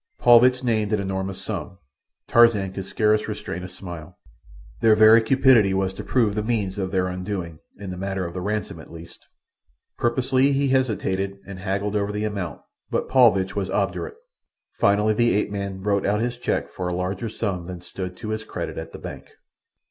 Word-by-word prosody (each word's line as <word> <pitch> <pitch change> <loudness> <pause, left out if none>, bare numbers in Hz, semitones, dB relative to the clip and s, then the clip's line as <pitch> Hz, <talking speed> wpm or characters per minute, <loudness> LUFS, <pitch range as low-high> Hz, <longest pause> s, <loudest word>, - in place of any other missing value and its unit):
Paulvitch 125 +1 +5
named 110 -3 0
an 105 - +2
enormous 95 0 -3
sum. 95 - -5 0.5
Tarzan 110 -5 +4
could 95 -1 -5
scarce 105 +1 +1
restrain 105 -4 -5
a 90 - -6
smile. 90 -2 -10 0.6
Their 110 - +5
very 110 +1 +7
cupidity 115 -5 +4
was 95 0 0
to - - -7
prove 115 -5 +1
the 105 - -1
means 105 -3 -2
of 95 -1 -2
their 95 -1 +1
undoing, 90 -3 -5 0.2
in 100 -2 -7
the 90 - -6
matter 95 0 -3
of 85 - -6
the 90 - -4
ransom 105 -3 -3
at 80 - -13
least. 85 +1 -12 0.8
Purposely 130 +3 +2
he 140 0 +1
hesitated 100 -7 0
and 100 -2 -8
haggled 100 +2 -2
over 100 0 0
the 105 +1 -3
amount, 100 -5 -4 0.3
but - - -2
Paulvitch 110 -8 +4
was 95 -2 -2
obdurate. 100 - -2 0.6
Finally 105 +2 +3
the 120 +1 +2
ape 105 0 0
man 100 -2 -4
wrote 100 -1 +1
out 105 +1 +1
his 120 +1 -2
cheque - - -2
for 90 - -4
a 90 - -2
larger 95 +5 -3
sum 95 -5 -3
than 90 0 -7
stood 90 +1 -7
to 110 - -6
his 110 0 -3
credit - - -5
at - - -8
the - - -7
bank. - - -9
100 Hz, 185 wpm, -23 LUFS, 95-110 Hz, 0.8 s, very